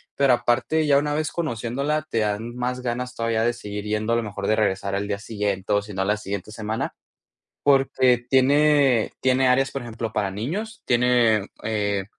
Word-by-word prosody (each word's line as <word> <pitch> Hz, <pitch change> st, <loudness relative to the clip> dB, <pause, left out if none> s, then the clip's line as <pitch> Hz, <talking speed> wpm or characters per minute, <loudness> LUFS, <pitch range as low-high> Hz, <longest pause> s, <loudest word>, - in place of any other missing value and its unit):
pero 135 Hz, -2 st, +4 dB
aparte, 120 Hz, +6 st, +1 dB
ya 140 Hz, -1 st, +5 dB
una 145 Hz, 0 st, -1 dB
vez 155 Hz, 0 st, -1 dB
conociéndola, 140 Hz, 0 st, -2 dB
te 115 Hz, -, 0 dB
dan 110 Hz, +3 st, -2 dB
más 125 Hz, +1 st, -2 dB
ganas 125 Hz, +1 st, -3 dB
todavía 115 Hz, -1 st, 0 dB
de 120 Hz, +1 st, +2 dB
seguir 105 Hz, -3 st, -7 dB
yendo 110 Hz, +2 st, -1 dB
a -, -, +3 dB
lo 115 Hz, -, -1 dB
mejor 100 Hz, -1 st, -5 dB
de 110 Hz, -, +3 dB
regresar 100 Hz, -2 st, 0 dB
al 100 Hz, +1 st, -2 dB
día 100 Hz, -1 st, -2 dB
siguiente 105 Hz, -2 st, -3 dB
o 100 Hz, -, +3 dB
si 105 Hz, 0 st, -10 dB
no 95 Hz, -, -2 dB
a -, -, -3 dB
la 105 Hz, +1 st, +1 dB
siguiente 100 Hz, 0 st, -5 dB
semana. 110 Hz, +1 st, -3 dB, 0.7 s
Porque 130 Hz, -3 st, +4 dB
tiene 140 Hz, -2 st, +4 dB
tiene 130 Hz, 0 st, +3 dB
áreas, 135 Hz, +1 st, +3 dB
por 135 Hz, -, -4 dB
ejemplo, 115 Hz, -1 st, -5 dB
para 100 Hz, -2 st, -1 dB
niños, 190 Hz, -, -4 dB
tiene, 120 Hz, -4 st, +3 dB, 0.2 s
eh 100 Hz, -3 st, -1 dB
115 Hz, 190 wpm, -23 LUFS, 105-130 Hz, 0.7 s, ya